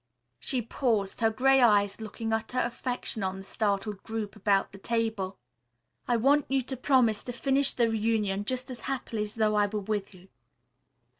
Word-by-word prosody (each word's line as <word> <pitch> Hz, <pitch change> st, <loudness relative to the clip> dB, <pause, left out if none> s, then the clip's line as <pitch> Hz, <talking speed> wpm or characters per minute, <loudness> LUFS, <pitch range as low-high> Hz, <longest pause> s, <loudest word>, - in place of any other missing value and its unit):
She 255 Hz, -3 st, -1 dB
paused, 220 Hz, -5 st, -1 dB
her 225 Hz, -, +5 dB
gray 265 Hz, +4 st, +4 dB
eyes 205 Hz, -3 st, +4 dB
looking 225 Hz, +1 st, -4 dB
utter 220 Hz, +3 st, -2 dB
affection 245 Hz, -2 st, -2 dB
on 190 Hz, 0 st, -2 dB
the 195 Hz, -, -8 dB
startled 200 Hz, 0 st, -1 dB
group 220 Hz, -2 st, -5 dB
about 200 Hz, -1 st, +1 dB
the 195 Hz, -, -12 dB
table. 220 Hz, -4 st, -1 dB, 0.7 s
"I 240 Hz, -, +3 dB
want 280 Hz, +5 st, +3 dB
you 270 Hz, -1 st, +1 dB
to 265 Hz, +2 st, -4 dB
promise 250 Hz, -5 st, +2 dB
to 245 Hz, -, -3 dB
finish 270 Hz, +3 st, +2 dB
the 235 Hz, -2 st, +2 dB
reunion 215 Hz, -3 st, 0 dB
just 255 Hz, +2 st, -3 dB
as 245 Hz, -, -7 dB
happily 250 Hz, -5 st, -3 dB
as 210 Hz, 0 st, -4 dB
though 215 Hz, -1 st, +2 dB
I 205 Hz, -1 st, +3 dB
were 210 Hz, +1 st, -3 dB
with 205 Hz, 0 st, -3 dB
you. 185 Hz, +1 st, -17 dB
220 Hz, 175 wpm, -28 LUFS, 205-250 Hz, 0.7 s, her